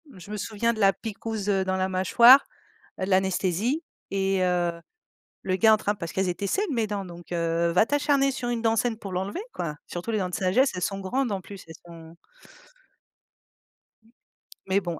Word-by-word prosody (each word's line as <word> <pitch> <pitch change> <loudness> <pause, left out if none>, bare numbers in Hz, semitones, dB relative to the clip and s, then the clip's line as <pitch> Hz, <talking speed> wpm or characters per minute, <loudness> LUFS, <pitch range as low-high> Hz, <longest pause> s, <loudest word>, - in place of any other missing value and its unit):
Je 185 +2 -12
me 210 - -4
souviens 225 +3 -1
de 220 - -8
la 195 -2 +5
piquouse, 220 -1 -5
heu, 195 -1 +1
dans 190 0 0
la 190 0 0
mâchoire, 235 +8 +6 0.6
heu, - - +1
l'anesthésie 190 - 0 0.3
et 195 -1 0
heu, 175 -1 +1 0.7
le 185 -1 0
gars 220 +2 +6
en - - +4
train 210 -1 -1
parce 170 -5 -7
qu'elles 190 -1 0
étaient 200 +3 -3
saines 395 - -1
mes 230 -5 0
dents, 205 -1 -3
donc 175 -1 -10
heu, 170 0 0
va 180 +5 +4
t'acharner 285 0 +2
sur 250 -2 -4
une 240 -1 -1
dent 225 -1 +1
saine 230 -1 0
pour 195 -3 -8
l'enlever, 190 - -3
quoi, 155 -3 -4
surtout 175 +6 -5
les 215 - 0
dents 180 -1 -2
de 180 - -4
sagesse. 215 +7 +2
Elles 180 - -4
sont 195 +2 -2
grandes 250 +5 -1
en 190 - -3
plus 195 -1 -11
elles 160 - -11
sont 165 -1 -13 2.5
Mais 195 +1 +2
bon, 170 -4 -5
195 Hz, 195 wpm, -26 LUFS, 180-225 Hz, 2.5 s, mâchoire